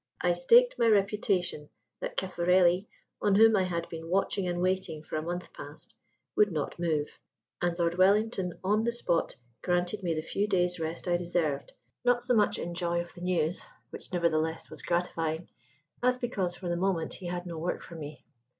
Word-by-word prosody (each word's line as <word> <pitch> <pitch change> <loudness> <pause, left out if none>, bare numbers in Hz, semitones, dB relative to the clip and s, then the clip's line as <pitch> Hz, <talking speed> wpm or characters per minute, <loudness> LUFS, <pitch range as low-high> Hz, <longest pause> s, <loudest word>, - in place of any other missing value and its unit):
I - - +2
staked - - +5
my 235 - +4
reputation 195 -6 +1 0.3
that - - -5
Caffarelli 180 +1 +3 0.3
(on 205 -1 +3
whom 220 +1 +7
I 195 - +3
had 170 -2 -2
been 165 0 -7
watching 195 0 +1
and 175 0 -1
waiting 185 -4 -1
for - - -6
a 155 - 0
month 175 +2 -5
past) - - -9 0.4
would 210 -2 +4
not 155 0 -3
move. 155 -4 -1 0.4
And 175 -1 0
Lord 170 0 0
Wellington 195 -1 +3
on 210 +3 +2
the 235 0 0
spot 175 -8 0 0.3
granted 180 +3 0
me 170 -3 -1
the 155 - -2
few 200 +5 -1
days' 180 -3 +1
rest 165 +2 -4
I 175 0 +3
deserved 170 -5 -1 0.3
not 245 0 +3
so 250 0 +1
much 210 -3 +3
in 170 - -4
joy 170 0 0
of 175 0 -5
the 175 - -12
news 175 -2 0 0.3
(which, - - -10
nevertheless, 160 -2 0
was - - -9
gratifying) 170 -1 -1 0.5
as 250 0 +3
because 195 -8 -2
for 180 - -7
the 175 0 0
moment 175 -3 0
he 180 - -7
had 175 0 -3
no 170 -2 -5
work 175 +3 -2
for - - -11
me. 150 -4 -8
175 Hz, 185 wpm, -29 LUFS, 170-195 Hz, 0.5 s, whom